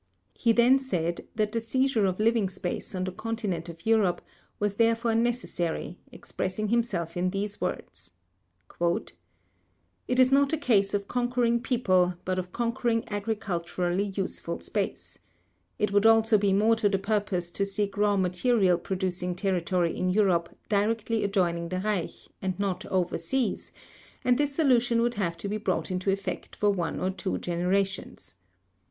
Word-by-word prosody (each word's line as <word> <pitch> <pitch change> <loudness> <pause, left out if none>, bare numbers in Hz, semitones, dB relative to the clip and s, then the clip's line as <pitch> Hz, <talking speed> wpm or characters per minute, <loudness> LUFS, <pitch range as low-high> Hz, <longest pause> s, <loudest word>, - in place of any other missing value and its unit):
He 230 - +2
then 245 +4 +5
said 175 -10 -2
that 210 -1 0
the 230 - -1
seizure 235 -2 +1
of 185 +1 -2
living 220 -2 +2
space 185 +1 -5
on 185 - -1
the 185 - -3
continent 200 -5 -3
of 165 0 -11
Europe 220 -5 +3 0.4
was 205 -1 -1
therefore 230 0 +2
necessary, 225 -8 -1
expressing 205 +3 -4
himself 200 -8 0
in 180 +1 +1
these 200 +1 -3
words: 95 - -5 0.7
"It 170 0 0 1.0
is 255 0 +5
not 280 +2 +4
a - - +2
case 205 -8 +2
of 200 -1 -2
conquering 245 -1 +1
people 185 -8 +2
but 185 0 0
of 180 0 -6
conquering 235 0 -1
agriculturally 200 -3 -2
useful 195 -2 -3
space. - - -4 0.6
It 210 - 0
would 205 +2 +5
also 225 -1 +5
be 200 -1 +2
more 215 +4 +4
to 215 -2 +2
the 195 - +1
purpose 195 -3 -1
to 200 - -1
seek 200 0 -2
raw 205 0 +2
material 185 0 +2
producing 180 -2 -2
territory 180 -2 0
in 185 - 0
Europe 180 -4 +2 0.2
directly 220 +2 0
adjoining 175 -4 0
the 185 +1 -2
Reich 200 -3 -3
and 190 -1 -2
not 195 -3 -2
overseas, 185 +7 -1 0.5
and 250 +1 +3
this 290 -1 0
solution 245 -6 +3
would 240 0 +1
have 175 -6 -2
to 200 - -5
be 210 +2 -2
brought 215 -2 -2
into 185 +1 -1
effect 195 0 -3
for 205 -1 +2
one 180 -4 -2
or 185 - 0
two 190 0 -3
generations.... 185 - -2
200 Hz, 155 wpm, -27 LUFS, 180-230 Hz, 1.0 s, then